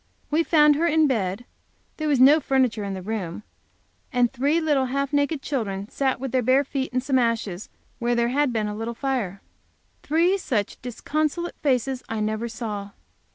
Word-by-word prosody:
We 310 Hz, +3 st, +3 dB
found 300 Hz, -3 st, +5 dB
her 335 Hz, +2 st, +2 dB
in 315 Hz, -1 st, +4 dB
bed; 215 Hz, -4 st, -1 dB, 0.5 s
there 310 Hz, -, -2 dB
was 285 Hz, -4 st, +2 dB
no 280 Hz, +5 st, +7 dB
furniture 260 Hz, -7 st, +1 dB
in 200 Hz, -1 st, -3 dB
the 185 Hz, -, -7 dB
room, 200 Hz, -3 st, -4 dB, 0.7 s
and 245 Hz, 0 st, +2 dB
three 280 Hz, +6 st, +2 dB
little 295 Hz, -5 st, +2 dB
half 275 Hz, +2 st, -2 dB
naked 285 Hz, 0 st, +1 dB
children 205 Hz, -7 st, -3 dB
sat 265 Hz, -3 st, 0 dB
with 265 Hz, -1 st, -4 dB
their 255 Hz, 0 st, +2 dB
bare 260 Hz, +4 st, +3 dB
feet 270 Hz, -1 st, -3 dB
in 255 Hz, 0 st, 0 dB
some 265 Hz, 0 st, +1 dB
ashes 225 Hz, -6 st, -1 dB, 0.3 s
where 240 Hz, 0 st, +1 dB
there 235 Hz, 0 st, +2 dB
had 285 Hz, +1 st, +1 dB
been 220 Hz, -2 st, -1 dB
a 210 Hz, -, -3 dB
little 225 Hz, +2 st, -4 dB
fire. 230 Hz, -8 st, -2 dB, 0.6 s
Three 345 Hz, +6 st, +2 dB
such 215 Hz, -, -2 dB
disconsolate 305 Hz, +7 st, -2 dB
faces 260 Hz, -2 st, 0 dB
I 225 Hz, -, -2 dB
never 215 Hz, +2 st, -1 dB
saw. 210 Hz, -3 st, -5 dB
255 Hz, 180 wpm, -24 LUFS, 220-285 Hz, 0.7 s, no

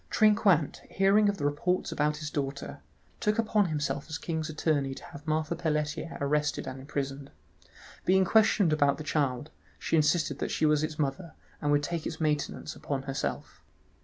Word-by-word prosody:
Trinquant 205 Hz, -8 st, +3 dB
hearing 200 Hz, +2 st, +4 dB
of 200 Hz, -, -1 dB
the 145 Hz, -, -2 dB
reports 175 Hz, +5 st, 0 dB
about 150 Hz, -1 st, 0 dB
his 155 Hz, -1 st, -5 dB
daughter, 140 Hz, -1 st, -4 dB, 0.4 s
took 210 Hz, +1 st, +1 dB
upon 215 Hz, -3 st, +2 dB
himself 145 Hz, -3 st, -2 dB
as 155 Hz, -, -3 dB
king's 160 Hz, 0 st, -3 dB
attorney 145 Hz, -3 st, 0 dB
to -, -, -11 dB
have 145 Hz, +2 st, -11 dB
Marthe 155 Hz, +1 st, 0 dB
Pelletier 155 Hz, -1 st, -2 dB
arrested 150 Hz, +1 st, 0 dB
and 130 Hz, 0 st, -6 dB
imprisoned. 135 Hz, 0 st, -4 dB, 0.7 s
Being 190 Hz, +1 st, +4 dB
questioned 210 Hz, -4 st, +4 dB
about 145 Hz, -2 st, +3 dB
the 155 Hz, -, -6 dB
child, 145 Hz, -2 st, -1 dB, 0.3 s
she -, -, -1 dB
insisted 150 Hz, -2 st, +2 dB
that -, -, -2 dB
she 155 Hz, -, +1 dB
was 150 Hz, 0 st, +3 dB
its 155 Hz, 0 st, -3 dB
mother, 150 Hz, +3 st, -2 dB, 0.3 s
and 145 Hz, -, +1 dB
would 145 Hz, 0 st, +3 dB
take 165 Hz, +1 st, -2 dB
its -, -, -6 dB
maintenance 155 Hz, 0 st, -1 dB
upon 135 Hz, -2 st, -3 dB
herself. 135 Hz, 0 st, -4 dB
155 Hz, 170 wpm, -29 LUFS, 145-170 Hz, 0.7 s, hearing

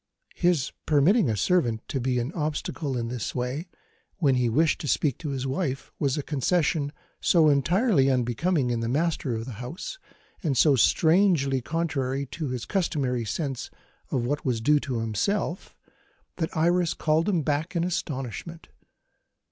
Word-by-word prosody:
His 175 Hz, -7 st, +1 dB, 0.2 s
permitting 160 Hz, -, +4 dB
a 110 Hz, -, 0 dB
servant 120 Hz, -, +1 dB
to 135 Hz, -, -1 dB
be 125 Hz, 0 st, 0 dB
an 120 Hz, +4 st, -1 dB
obstacle 150 Hz, -3 st, -2 dB
in 115 Hz, -1 st, -2 dB
his 120 Hz, -3 st, -4 dB
way, 130 Hz, +7 st, -3 dB, 0.5 s
when 145 Hz, -8 st, +3 dB
he 125 Hz, -2 st, +2 dB
wished 155 Hz, +7 st, +2 dB
to 150 Hz, -, -4 dB
speak 140 Hz, -2 st, +1 dB
to 150 Hz, -, -4 dB
his 135 Hz, -1 st, -3 dB
wife, 135 Hz, -1 st, -2 dB
was 140 Hz, -2 st, +1 dB
a 145 Hz, -, -2 dB
concession 150 Hz, 0 st, 0 dB, 0.3 s
so 160 Hz, -3 st, +4 dB
entirely 165 Hz, -, +3 dB
unbecoming 130 Hz, +3 st, +1 dB
in 120 Hz, -, 0 dB
the 115 Hz, 0 st, -2 dB
master 145 Hz, -3 st, 0 dB
of 115 Hz, 0 st, -4 dB
the 130 Hz, -, -6 dB
house, 170 Hz, -, -6 dB, 0.4 s
and 150 Hz, -8 st, 0 dB
so 145 Hz, +2 st, +5 dB
strangely 160 Hz, -, +3 dB
contrary 140 Hz, -3 st, -1 dB
to 150 Hz, +3 st, -5 dB
his 125 Hz, -2 st, -4 dB
customary 140 Hz, -, -1 dB
sense 135 Hz, +2 st, -3 dB, 0.4 s
of 120 Hz, -3 st, -1 dB
what 145 Hz, +4 st, -1 dB
was 125 Hz, -5 st, 0 dB
due 150 Hz, +6 st, +3 dB
to 125 Hz, -5 st, -3 dB
himself, 165 Hz, -, -2 dB, 0.6 s
that 165 Hz, -2 st, -3 dB
Iris 175 Hz, +1 st, +2 dB
called 160 Hz, +4 st, +1 dB
him 175 Hz, -6 st, +1 dB
back 155 Hz, +5 st, -1 dB
in 170 Hz, -, +1 dB
astonishment. 165 Hz, -1 st, -4 dB
145 Hz, 160 wpm, -26 LUFS, 125-165 Hz, 0.6 s, so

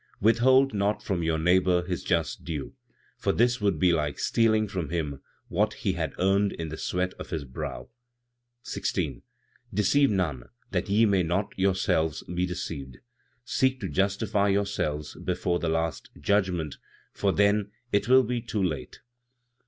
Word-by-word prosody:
"Withhold 130 Hz, +5 st, +4 dB
not 100 Hz, +1 st, 0 dB
from 95 Hz, -4 st, -1 dB
your 80 Hz, -1 st, +1 dB
neighbor 90 Hz, +1 st, +3 dB
his 90 Hz, -1 st, -3 dB
just 80 Hz, -6 st, -1 dB
due, 80 Hz, -5 st, -5 dB, 0.5 s
for -, -, +1 dB
this 120 Hz, 0 st, +2 dB
would 100 Hz, -5 st, +2 dB
be 90 Hz, +2 st, +4 dB
like 75 Hz, -3 st, -1 dB
stealing 110 Hz, -2 st, +2 dB
from 90 Hz, -6 st, -4 dB
him 75 Hz, -5 st, -3 dB, 0.3 s
what -, -, 0 dB
he -, -, -1 dB
had -, -, -3 dB
earned 100 Hz, +2 st, +2 dB
in 80 Hz, -1 st, -5 dB
the 80 Hz, -, -5 dB
sweat 90 Hz, +1 st, -1 dB
of -, -, -7 dB
his 80 Hz, -3 st, -3 dB
brow. 65 Hz, -2 st, -6 dB, 0.8 s
16. -, -, -2 dB, 0.5 s
"Deceive 125 Hz, +8 st, +3 dB
none, 80 Hz, -, -1 dB, 0.3 s
that -, -, -1 dB
ye 110 Hz, +3 st, +4 dB
may 100 Hz, -3 st, +3 dB
not 90 Hz, +4 st, -1 dB
yourselves 95 Hz, -5 st, +1 dB
be 90 Hz, +1 st, -2 dB
deceived; 70 Hz, -7 st, -5 dB, 0.5 s
seek 130 Hz, 0 st, +1 dB
to -, -, -3 dB
justify 100 Hz, +1 st, +1 dB
yourselves 100 Hz, -7 st, -1 dB
before 85 Hz, -1 st, 0 dB
the 85 Hz, -, -1 dB
last 80 Hz, -1 st, -2 dB
judgment, 90 Hz, -7 st, 0 dB, 0.4 s
for 100 Hz, -, +1 dB
then 100 Hz, +1 st, +2 dB, 0.2 s
it 100 Hz, -, +1 dB
will 130 Hz, +1 st, +6 dB
be 120 Hz, 0 st, -2 dB
too 110 Hz, -4 st, -2 dB
late. 80 Hz, -7 st, -3 dB
95 Hz, 155 wpm, -27 LUFS, 80-105 Hz, 0.8 s, will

